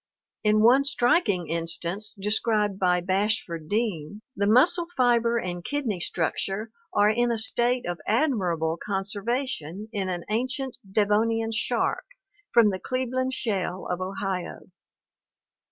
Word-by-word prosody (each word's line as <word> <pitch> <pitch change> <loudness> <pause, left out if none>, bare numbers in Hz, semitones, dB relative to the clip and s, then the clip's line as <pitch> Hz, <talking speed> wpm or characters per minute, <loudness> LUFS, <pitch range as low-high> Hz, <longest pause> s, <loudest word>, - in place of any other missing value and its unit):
In 215 0 +4
one 255 +4 +6
striking 240 - +2
instance 170 +5 -2
described 210 -1 0
by 180 -1 +2
Bashford 185 -4 -1
Dean 205 -3 -2
the 200 - 0
muscle 335 - +4
fiber 235 -2 +3
and 175 -5 -4
kidney 255 -9 -2
structure 195 +5 -2 0.2
are 205 +1 +4
in 240 +2 +1
a 230 - 0
state 240 +3 +1
of 175 -2 -4
admirable 180 - +1
con 195 -2 -1
servation 210 - -3
in 195 -4 -2
an 175 -2 -3
ancient 260 +3 -2 0.2
Devonian 225 +2 +2
shark 225 +2 -1
(Cla - - -18
doselacke) 410 -2 -40
from 210 - +4
the 185 - -4
Cleveland 255 +2 -2
shale 190 -4 -2
of 180 +1 -2
Ohio. 185 -1 -4
210 Hz, 135 wpm, -26 LUFS, 185-240 Hz, 0.2 s, one